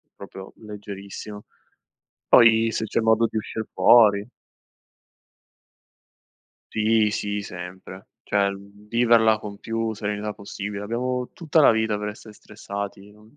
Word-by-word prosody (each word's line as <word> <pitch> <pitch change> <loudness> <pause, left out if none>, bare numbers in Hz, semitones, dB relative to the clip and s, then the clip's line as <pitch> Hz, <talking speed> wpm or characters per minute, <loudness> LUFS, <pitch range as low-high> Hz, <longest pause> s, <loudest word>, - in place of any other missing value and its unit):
proprio 95 -1 -11
leggerissimo. 105 -1 -9 0.8
Poi 115 -1 +5
se - - -2
c'è - - -1
modo 110 0 +3
di 110 - -4
uscir 110 0 -4
fuori. 105 -2 +5 2.4
Sì, 110 0 +2
sì, 105 0 -3
sempre. 95 0 -10 0.2
Cioè, 100 -1 +1
mhmm, 100 +1 -13
viverla 115 -1 +4
con 100 -1 -8
più 115 0 -3
serenità 105 0 -4
possibile. 100 0 -7
Abbiamo 125 +3 -3
tutta 160 -2 +1
la 140 - +7
vita 110 -1 0
per 105 0 -4
essere 105 +1 -12
stressati, 100 -1 -8
non 105 +3 -21
105 Hz, 120 wpm, -23 LUFS, 100-110 Hz, 2.4 s, la